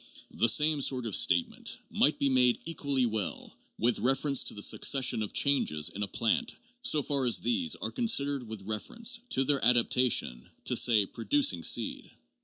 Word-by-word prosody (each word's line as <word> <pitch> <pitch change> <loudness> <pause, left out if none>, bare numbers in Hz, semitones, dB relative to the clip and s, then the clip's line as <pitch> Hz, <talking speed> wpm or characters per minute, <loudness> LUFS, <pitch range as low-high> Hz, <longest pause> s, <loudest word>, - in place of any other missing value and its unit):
The 115 - +1
same 150 +3 +1
sort 130 -2 0
of 110 - -2
statement 85 -3 +1
might 150 - +3
be 140 - 0
made 125 -2 +2
equally 140 -6 -1
well 110 -4 -3 0.2
with 120 +1 0
reference 135 +2 +1
to - - -1
the 105 - -2
succession 130 -5 +2
of 105 - -5
changes 75 - +1
in 100 - -9
a 100 - -2
plant, 115 - -2 0.3
so 150 - +2
far 140 -1 -1
as 120 - +2
these 245 0 0
are - - -5
con 245 -3 -3
sidered 140 - +1
with 110 -3 -9
reference 230 - -3
to 135 - 0
their 140 0 0
adaptation 120 - +1 0.2
to, - - +1
say, 110 -4 +3
producing 115 -3 -1
seed. - - 0
125 Hz, 175 wpm, -28 LUFS, 110-145 Hz, 0.3 s, might